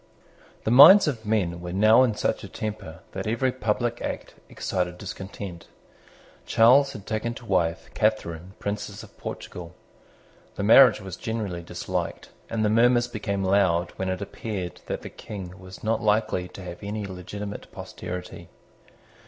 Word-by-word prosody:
The 110 - 0
minds 155 +10 +10
of 115 -7 -3
men 90 -6 0
were 90 0 -6
now 110 +6 +6
in 120 -5 +2
such - - -1
a - - -8
temper 100 -6 -6
that 95 +2 -5
every 120 +4 +1
public 120 0 -1
act - - -5 0.2
excited 90 -1 -2
discontent. 95 -2 -8 0.8
Charles 135 +5 +5
had 105 -2 -9
taken 115 +2 -2
to 120 - -11
wife 85 -5 0
Catharine 95 -5 -1
Princess 100 -1 -5
of - - -15
Portugal. 85 0 -7 0.8
The 100 - -3
marriage 115 +2 +7
was 95 -3 -7
generally 105 -6 -3
disliked; 85 0 -4 0.2
and 110 -1 0
the - - +4
murmurs 120 +2 +4
became 100 -4 -3
loud 95 -3 +2
when 95 0 -2
it 95 +2 -2
appeared 100 -3 -5
that - - -4
the - - -6
King 95 -4 -8
was 95 0 -12
not 110 0 0
likely 105 -4 +1
to 95 - -11
have 90 -1 -8
any 105 0 -4
legitimate 100 +2 -7
posterity. 90 0 -7
100 Hz, 155 wpm, -25 LUFS, 90-110 Hz, 0.8 s, minds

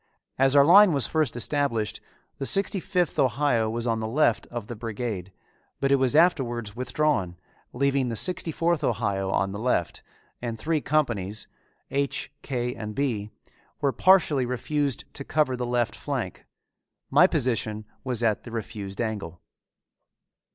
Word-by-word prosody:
As 135 +1 +4
our 140 -1 +7
line 190 +2 +8
was 140 -3 +1
first 155 -5 0
established 120 -4 0 0.4
the 135 - -2
Sixty 195 0 +2
fifth 180 -3 -1
Ohio 125 -3 +2
was 115 +1 -3
on 115 -2 0
the 110 - -3
left 120 -1 +1
of 120 -3 -6
the 120 - -7
brigade, 110 -4 -5 0.5
but 135 0 +1
it 140 - +6
was 130 +1 +2
afterwards 120 - +2
withdrawn, 125 - 0 0.3
leaving 135 -1 +1
the 115 - -3
Sixty 175 - +1
fourth 165 0 0
Ohio 100 -7 0
on 95 0 0
the 100 - -5
left 110 -7 -1 0.4
and 115 -2 -4
three 155 +5 -1
companies, 120 -11 -1 0.4
H, 140 0 -2
K, 125 -2 -2
and 105 -2 -7
B, 115 -7 -1 0.5
were 140 -2 +1
partially 160 -9 +4
refused 140 +2 -1
to 140 - -6
cover 150 -3 +1
the 125 -1 -3
left 120 -1 0
flank. - - -5 0.6
My - - +7
position 110 -3 -1 0.2
was 125 -3 -2
at 110 -2 +2
the - - -9
refused 105 -3 -6
angle. 105 -7 -3
125 Hz, 150 wpm, -26 LUFS, 110-145 Hz, 0.6 s, line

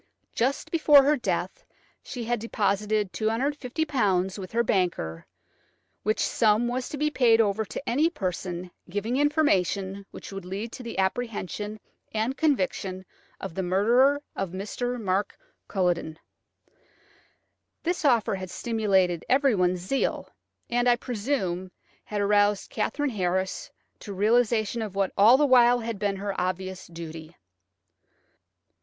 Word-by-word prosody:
Just 260 +4 -1
before 300 -4 +6
her 295 +2 +4
death - - -3 0.4
she 245 -3 -6
had 240 0 -1
deposited 210 -2 0
£250 235 - 0
with 185 -1 -7
her 235 +1 +2
banker, 175 - -1 0.7
which 215 +2 0
sum 220 +1 +2
was 250 +1 -2
to 295 - -5
be 300 +1 0
paid 235 -5 +4
over 215 0 +2
to 275 - -7
any 295 +7 +3
person 180 - -4 0.2
giving 210 +7 -2
information 200 - +1
which - - -10
would 195 -1 -6
lead 200 +5 -5
to - - -8
the 235 -2 -7
apprehension 210 0 -2 0.4
and 225 +5 0
conviction 190 -10 -1 0.3
of - - -6
the 190 - -2
murderer 240 +10 +3
of 195 - -2
Mr. 245 +6 -3
Mark 200 -1 -1 0.3
Culledon. 175 -4 -1 1.7
This 350 +1 -1
offer 240 -8 +3
had 190 -1 -5
stimulated 190 -6 +1
everyone's 205 -10 +3
zeal, 235 +10 -1 0.4
and, 245 +1 +2
I 240 - +5
presume, 205 -7 -2 0.4
had 210 -1 -3
aroused 205 0 +2
Katherine 290 -2 -1
Harris 190 - -1 0.3
to 205 - -7
a - - -9
realisation 225 +2 +2
of 210 -3 -5
what 195 -1 +1
had 200 - +1
all 235 +5 +8
the 295 - +4
while 240 -3 +4
been 200 -1 -1
her 200 +1 -3
obvious 185 +1 -3
duty. 165 -1 -9
210 Hz, 135 wpm, -26 LUFS, 190-245 Hz, 1.7 s, all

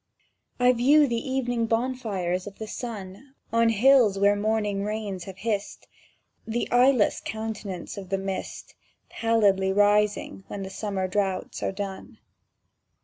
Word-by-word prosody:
I 250 0 +5
view 285 +5 +5
the 235 -1 -2
evening 245 -3 0
bonfires 220 -7 -1
of 200 - -9
the 220 - -5
sun 215 +3 -8 0.2
On 230 0 +4
hills 225 -2 +5
where 200 +1 +4
morning 210 -1 0
rains 205 -4 -4
have 190 -1 -9
hissed; 205 -1 -3 0.6
The 230 +2 -1
eyeless 245 -2 +4
countenance 215 -4 -5
of 190 -2 -8
the 195 - 0
mist 195 0 -5 0.4
Pallidly 205 -4 +2
rising 205 0 +2
when 200 - -6
the 190 - -7
summer 195 -2 -2
droughts 190 0 -2
are - - -1
done. 195 -1 -7
210 Hz, 135 wpm, -26 LUFS, 195-230 Hz, 0.6 s, I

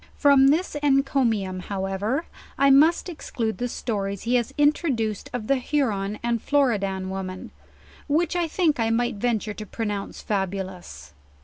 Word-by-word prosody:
From 280 -2 +6
this 320 +7 +2
enco 275 -1 +2
mium, 195 -5 -1
however, 200 - -2 0.3
I 275 0 +5
must 310 +7 +5
exclude 240 -10 -4
the 245 - -1
stones 200 -5 -3
he 235 - 0
has 240 -2 +1
introduced 280 - +1
of 245 -3 -4
the 275 +4 +2
Huron 220 -7 -1
and 235 -1 0
Florid 265 -8 +2
an 190 -1 -3
women, 185 -1 -6 0.6
which 325 +4 +1
I 345 -1 +1
think 320 -4 +1
I 225 0 +1
might 235 -1 0
venture 220 -1 -1
to 215 - -7
pronounce 205 -1 -4
fabulous. 185 - -4
230 Hz, 150 wpm, -24 LUFS, 195-275 Hz, 0.6 s, From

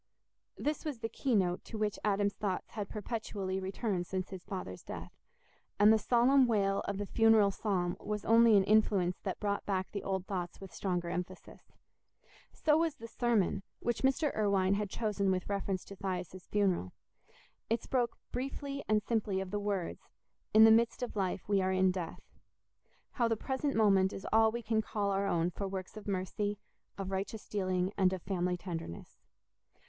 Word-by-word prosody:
This 300 0 -2
was 300 -5 -3
the 225 0 -4
key 250 +2 0
note 180 -3 +1
to 225 - -7
which 210 -1 -1
Adam's 205 -1 +1
thoughts 195 -3 -3
had 205 -3 -5
perpetually 205 -3 -3
returned 190 -1 -2
since 185 -1 -3
his 185 -2 -7
father's 180 - -6
death, - - -8 0.7
and 210 +2 +8
the 220 - +3
solemn 250 +4 +4
wail 200 -3 +2
of 200 - -2
the 205 - -2
funeral 225 -1 +5
psalm 185 -3 -1
was 210 -1 -4
only 230 -1 +6
an 195 - +5
influence 195 -3 +3
that 190 - -4
brought 200 -1 -1
back 190 -2 -1
the 200 - -4
old 190 -1 -2
thoughts 180 -3 -4
with 195 -2 -10
stronger 175 -3 -2
emphasis. 180 +1 -7 0.8
So 300 -1 +2
was 325 -2 +1
the 230 -5 -9
sermon, 225 -4 +1 0.2
which 240 -1 -1
Mr. 270 +3 +2
Irwine 200 -3 +2
had 205 0 -1
chosen 205 -2 0
with 185 -1 0
reference 195 -2 -2
to 200 - -10
Thias's 185 -2 -5
funeral. 190 - +1 0.8
It 230 0 0
spoke 245 -3 0
briefly 275 +2 -4
and 210 -1 +3
simply 210 -4 0
of 190 -1 -5
the 205 - -1
words, 200 -4 -3 0.4
"In 220 +1 +8
the 220 - +9
midst 230 +2 +3
of 245 - -4
life 190 -2 -2
we 200 -1 +3
are 185 0 +1
in 185 0 +3
death"—how 185 - -7
the 225 -1 0
present 270 +4 -2
moment 195 -3 +4
is 195 - -7
all 220 0 +5
we 235 +1 -4
can 220 0 +1
call 205 -2 -1
our 195 +1 0
own 170 -2 +1
for 200 +3 -4
works 190 +1 -6
of 215 -1 -9
mercy, 205 +2 -2 0.4
of 195 -1 -4
righteous 195 +3 -4
dealing, 185 -1 -1
and 185 -1 +4
of 185 - -5
family 180 -1 -1
tenderness. 165 - -7
200 Hz, 180 wpm, -32 LUFS, 190-220 Hz, 0.8 s, the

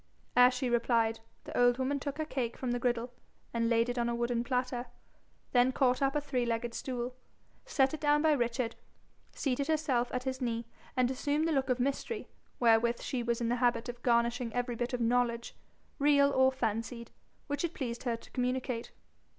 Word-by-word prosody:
Ere 250 0 +8
she 250 0 -2
replied, 230 -2 +2 0.2
the - - -8
old 245 0 +4
woman 270 +2 0
took 285 0 -4
her 310 - -1
cake 245 -6 -3
from 255 -2 -2
the 245 - 0
griddle, 240 0 -1 0.4
and 230 -1 +1
laid 230 0 +3
it 245 0 -2
on 235 0 +1
a 235 - -1
wooden 235 0 0
platter, 250 0 -1 0.6
then 250 +1 +4
caught 255 0 +2
up 275 0 +2
a - - +3
three 260 -4 -1
legged 235 0 -2
stool, 250 -1 -3 0.5
set 275 - +2
it 315 - -5
down 295 0 +3
by 315 - +5
Richard, 240 -3 0 0.6
seated 275 0 -1
herself 285 -6 +1
at 250 0 -2
his 260 0 -3
knee, 230 -1 -1 0.3
and 250 0 +3
assumed 290 +4 0
the - - +1
look 270 -3 +1
of 255 0 +1
mystery 280 - -2 0.3
wherewith 235 0 +4
she 255 - -2
was 235 0 -1
in 230 - 0
the 245 - +1
habit 240 -1 +1
of 240 0 -7
garnishing 235 0 +1
every 245 -1 -1
bit 240 +2 -2
of 245 - -1
knowledge, 235 0 +1 0.4
real 280 0 +5
or 260 -1 +4
fancied, 235 -1 -3 0.3
which 285 +1 -2
it 340 -1 -2
pleased 240 -3 -4
her 235 -3 -1
to - - -17
communicate. 250 -1 -2
245 Hz, 195 wpm, -31 LUFS, 235-265 Hz, 0.6 s, Ere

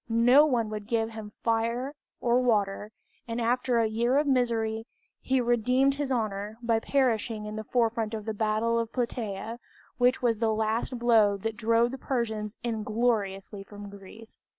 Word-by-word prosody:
No 245 +6 +6
one 230 -6 0
would 210 -1 -5
give 225 -1 0
him 220 -2 -8
fire 235 +4 0 0.3
or 245 +1 +2
water, 210 -3 0 0.4
and 230 0 -3
after 245 +1 +1
a 230 - +3
year 235 +4 +1
of 295 - +3
misery, 230 -4 0 0.3
he 265 0 +1
redeemed 250 +3 +2
his 280 -1 -3
honor 215 -3 -2
by 230 -1 +2
perishing 225 -4 0
in 210 0 -6
the 215 - -4
forefront 225 -1 0
of 215 -1 -6
the 220 - -2
battle 220 +2 +1
of 230 -1 -3
Plataea, 230 -2 -3 0.4
which 250 +1 +3
was 230 -3 +1
the 225 -1 +2
last 220 +3 -1
blow 225 -4 +4
that 225 +2 -4
drove 230 +1 +2
the 265 - -7
Persians 220 -5 -3
ingloriously 215 -3 -1
from 205 0 -10
Greece. 200 +3 -12
230 Hz, 165 wpm, -28 LUFS, 215-245 Hz, 0.4 s, No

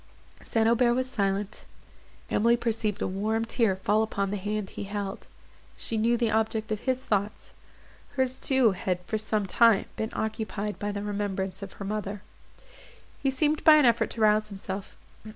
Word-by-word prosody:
St. 225 -1 +1
Aubert 240 +1 +3
was 255 +1 0
silent; 200 -4 -2 0.7
Emily 235 +2 +3
perceived 225 -3 -1
a - - 0
warm 215 +4 -1
tear 230 -4 +2
fall 205 +3 +1
upon 200 -3 -1
the 205 - -1
hand 205 0 -3
he - - -6
held; 200 0 -5 0.5
she 230 - -1
knew 230 +2 +2
the 230 -2 +1
object 220 0 0
of 215 - -1
his 260 +1 -1
thoughts; 205 -2 -2 0.6
hers 260 -1 0
too 265 -5 +3
had, 185 -1 -2
for 220 - -2
some 215 -1 -1
time, 225 +1 +4
been 220 - -2
occupied 215 -1 -3
by 205 0 -2
the 200 0 -4
remembrance 200 -2 -3
of 195 -1 -7
her 200 - -7
mother. 205 -1 -4 1.0
He 275 - +2
seemed 300 +3 0
by 310 - +9
an 300 -3 +5
effort 235 -1 +3
to 225 - -5
rouse 215 0 +4
himself. 195 -1 -6
215 Hz, 170 wpm, -27 LUFS, 200-230 Hz, 1.0 s, by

